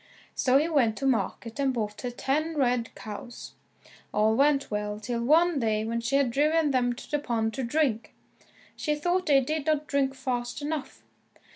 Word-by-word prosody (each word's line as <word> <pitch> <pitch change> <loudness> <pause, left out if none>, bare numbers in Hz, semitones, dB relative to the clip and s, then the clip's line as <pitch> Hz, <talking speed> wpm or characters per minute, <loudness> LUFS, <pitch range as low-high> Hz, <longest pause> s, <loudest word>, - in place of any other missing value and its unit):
So 260 0 +3
he 300 +3 +2
went 250 -9 +2
to 270 - -3
market 240 -1 -1
and 275 -1 +2
bought 210 -4 -3
her 250 - -3
ten 300 +6 -1
red 245 -4 0
cows. 220 +3 -8 0.6
All 215 +1 +2
went 280 0 +2
well 210 0 -3
till 235 +2 -3
one 320 +4 +4
day 220 -2 0
when 230 +1 -2
she 235 +4 -1
had 275 -3 +3
driven 300 +3 +2
them 245 -2 +1
to 240 - -12
the 295 - +1
pond 225 -5 -1
to 265 - -3
drink, 235 -3 0 0.6
she 300 -2 -1
thought 350 +4 0
they 275 -2 +5
did 305 +3 -3
not 305 -1 +1
drink 275 -2 0
fast 245 -2 -3
enough. 295 -2 -5
265 Hz, 180 wpm, -27 LUFS, 235-295 Hz, 0.6 s, they